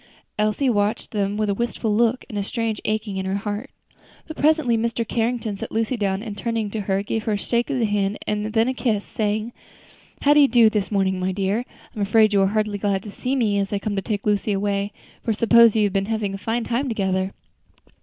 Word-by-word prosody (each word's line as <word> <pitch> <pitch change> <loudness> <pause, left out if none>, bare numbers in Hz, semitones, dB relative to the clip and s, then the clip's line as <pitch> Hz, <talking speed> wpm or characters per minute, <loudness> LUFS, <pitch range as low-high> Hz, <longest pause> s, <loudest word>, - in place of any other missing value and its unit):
Elsie 215 +6 +1
watched 210 -1 0
them 205 -1 -1
with 215 0 0
a 200 - +1
wistful 230 -1 -1
look 235 +2 +2
and 220 - -8
a 205 - 0
strange 225 0 -2
aching 215 -2 -1
at 190 - -3
her 190 +1 -1
heart. 210 +5 -4 0.6
But 315 - -7
presently 305 -6 +3
Mr. 230 0 -1
Carrington 225 -3 -1
set - - -6
Lucy 225 +3 0
down 200 -2 -1
and 215 -3 -6
turning 225 0 -2
to 220 - -3
her, 195 0 0
gave 215 +1 -3
her 220 - +1
a - - +1
shake 235 +5 -1
of 280 - 0
the 235 - +2
hand, 205 -1 0
and 210 0 -2
then 225 +1 +3
a 260 - 0
kiss, 220 -6 -1
saying, 215 +2 -2 0.7
"How 290 - +6
do 295 - +5
you 285 - +7
do 230 -3 +5
this 210 -2 -1
morning, 190 -2 +1
my 185 +1 0
dear? 200 +5 -1 0.3
I'm 210 - -4
afraid 215 +1 +4
you 200 - +4
are 195 - +4
hardly 210 0 -1
glad 195 -1 0
to 210 - -8
see 255 +6 -2
me, 215 -6 +1
as 195 -1 -2
I 205 - 0
come 205 +1 -3
to 195 - 0
take 205 0 -3
Lucy 210 0 +1
away, 200 0 -1 0.3
for - - -4
I - - +3
suppose 230 0 +6
you 215 - +3
have 200 -2 +1
been 195 0 0
having 215 -3 -2
fine 225 +4 -2
times 245 +4 -1
together." 190 -3 -1
215 Hz, 235 wpm, -23 LUFS, 200-230 Hz, 0.7 s, you